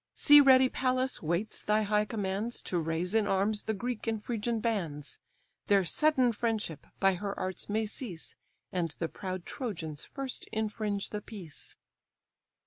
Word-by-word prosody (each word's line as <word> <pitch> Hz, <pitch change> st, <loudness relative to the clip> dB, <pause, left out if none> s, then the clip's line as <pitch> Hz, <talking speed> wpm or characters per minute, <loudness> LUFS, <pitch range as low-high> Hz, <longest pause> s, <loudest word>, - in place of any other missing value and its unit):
See 295 Hz, 0 st, +8 dB
ready 260 Hz, -1 st, +7 dB
Pallas 255 Hz, 0 st, 0 dB
waits 170 Hz, +7 st, -1 dB
thy 215 Hz, +1 st, +2 dB
high 210 Hz, 0 st, +2 dB
commands 205 Hz, +2 st, -2 dB
To 175 Hz, -, -1 dB
raise 165 Hz, +3 st, -1 dB
in 220 Hz, -2 st, +3 dB
arms 205 Hz, +2 st, +1 dB
the 220 Hz, -, -1 dB
Greek 240 Hz, +2 st, -4 dB
and 225 Hz, -1 st, 0 dB
Phrygian 230 Hz, +1 st, -2 dB
bands; 170 Hz, -11 st, -2 dB, 0.5 s
Their 200 Hz, -1 st, +5 dB
sudden 265 Hz, -, +3 dB
friendship 215 Hz, -, -2 dB
by 195 Hz, 0 st, +4 dB
her 200 Hz, +2 st, -4 dB
arts 185 Hz, +2 st, -4 dB
may 220 Hz, +2 st, +1 dB
cease, 205 Hz, -6 st, -5 dB, 0.4 s
And 175 Hz, -3 st, 0 dB
the 165 Hz, -, -1 dB
proud 185 Hz, 0 st, -5 dB
Trojans 165 Hz, -, -5 dB
first 270 Hz, -2 st, -5 dB
infringe 215 Hz, -2 st, -2 dB
the 210 Hz, -, -3 dB
peace." 190 Hz, -8 st, -7 dB
210 Hz, 150 wpm, -31 LUFS, 185-230 Hz, 0.5 s, See